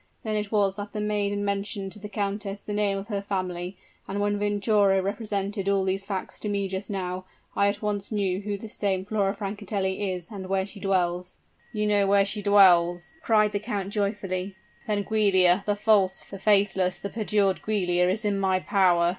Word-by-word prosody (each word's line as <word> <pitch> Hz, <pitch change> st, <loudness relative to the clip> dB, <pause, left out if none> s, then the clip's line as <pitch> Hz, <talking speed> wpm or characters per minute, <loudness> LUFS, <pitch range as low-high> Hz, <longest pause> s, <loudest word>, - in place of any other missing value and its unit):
Then 215 Hz, -1 st, -1 dB
it 210 Hz, -1 st, -2 dB
was 200 Hz, -2 st, +2 dB
that 205 Hz, 0 st, -6 dB
the 215 Hz, -, -3 dB
maiden 205 Hz, -1 st, -1 dB
mentioned 200 Hz, -1 st, -2 dB
to 210 Hz, -, -6 dB
the 210 Hz, 0 st, -8 dB
countess 200 Hz, 0 st, -3 dB
the 210 Hz, -, -6 dB
name 205 Hz, -1 st, +1 dB
of 195 Hz, +3 st, -7 dB
her 200 Hz, -2 st, -1 dB
family, 185 Hz, -2 st, -3 dB, 0.3 s
and 200 Hz, +1 st, -3 dB
when 205 Hz, 0 st, 0 dB
Venturo 205 Hz, -1 st, +3 dB
represented 200 Hz, 0 st, -2 dB
all 195 Hz, -1 st, +2 dB
these 190 Hz, +1 st, -1 dB
facts 195 Hz, -2 st, -5 dB
to 210 Hz, -, -3 dB
me 200 Hz, -1 st, 0 dB
just 190 Hz, +1 st, -5 dB
now, 185 Hz, -2 st, -3 dB, 0.3 s
I 200 Hz, -, +3 dB
at 205 Hz, +1 st, -2 dB
once 205 Hz, 0 st, -2 dB
knew 195 Hz, -3 st, 0 dB
who 205 Hz, 0 st, -3 dB
this 215 Hz, +1 st, -10 dB
same 190 Hz, -2 st, -1 dB
Flora 200 Hz, -1 st, 0 dB
Francatelli 200 Hz, -1 st, -2 dB
is 180 Hz, -2 st, -6 dB
and 195 Hz, -3 st, -6 dB
where 190 Hz, 0 st, +1 dB
she 200 Hz, +1 st, -12 dB
dwells." 180 Hz, -2 st, -1 dB, 0.3 s
"You 210 Hz, -2 st, -1 dB
know 205 Hz, -1 st, +3 dB
where 200 Hz, 0 st, +4 dB
she 210 Hz, +1 st, -2 dB
dwells!" 180 Hz, -, +4 dB
cried 215 Hz, -5 st, +3 dB
the 205 Hz, -, -1 dB
count, 205 Hz, -3 st, -4 dB
joyfully. 200 Hz, -2 st, -2 dB, 0.3 s
"Then, 205 Hz, -1 st, 0 dB
Giulia, 195 Hz, -4 st, +4 dB
the 205 Hz, -, +2 dB
false, 205 Hz, -3 st, +3 dB
the 195 Hz, -, -10 dB
faithless, 195 Hz, -3 st, +2 dB
the 200 Hz, -, -6 dB
perjured 205 Hz, -3 st, +1 dB
Giulia 180 Hz, -4 st, +1 dB
is 215 Hz, +3 st, -1 dB
in 200 Hz, -1 st, +1 dB
my 190 Hz, -1 st, +2 dB
power! 180 Hz, -3 st, +3 dB
200 Hz, 195 wpm, -26 LUFS, 190-205 Hz, 0.3 s, where